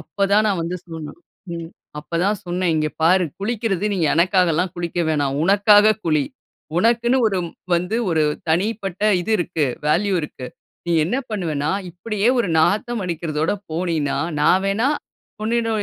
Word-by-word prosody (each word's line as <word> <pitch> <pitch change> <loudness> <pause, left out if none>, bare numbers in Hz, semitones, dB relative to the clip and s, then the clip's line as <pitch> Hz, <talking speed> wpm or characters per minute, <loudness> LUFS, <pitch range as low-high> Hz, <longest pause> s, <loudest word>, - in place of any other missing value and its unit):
அப்போ 200 - -6
தான் 210 +1 +5
நான் 195 -4 0
வந்து 175 +2 -3
சொன்னேன் 160 -1 -8 0.3
ம் 165 0 -6 0.3
அப்போ 170 +3 -5
தான் 205 +1 +1
சொன்னேன், 180 -1 0
'இங்கே 155 -1 0
பாரு 180 +2 +4 0.2
குளிக்குறது 210 -2 -1
நீ - - -2 0.2
எனக்காக 180 +1 +3
எல்லாம் 175 +2 0
குளிக்க 175 0 -2
வேணாம். 145 -3 0
உனக்காக 205 +2 +5
குளி. 155 -4 +2 0.5
உனக்குன்னு 235 +5 +3
ஒரு 190 -2 -1 0.4
வந்து 180 +6 0
ஒரு 160 -2 +2 0.3
தனிப்பட்ட 195 +3 -1 0.2
இது 185 - -4
இருக்கு, 170 -3 -1 0.2
வேல்யூ 190 +7 +2
இருக்கு. 130 -4 -7 0.4
நீ 170 - 0
என்ன 190 +10 -1
பண்ணுவேன்னா 160 -8 -2 0.2
இப்படியே 205 +5 -1
ஒரு 215 - +1
நாத்தம் 215 +6 +1
அடிக்குறதோட 160 -3 -2 0.2
போனின்னா 160 -3 -1 0.2
நான் 185 +5 +4
வேணா 210 +7 +1 0.5
உன்னிட 230 +1 0
180 Hz, 150 wpm, -21 LUFS, 165-205 Hz, 0.5 s, தான்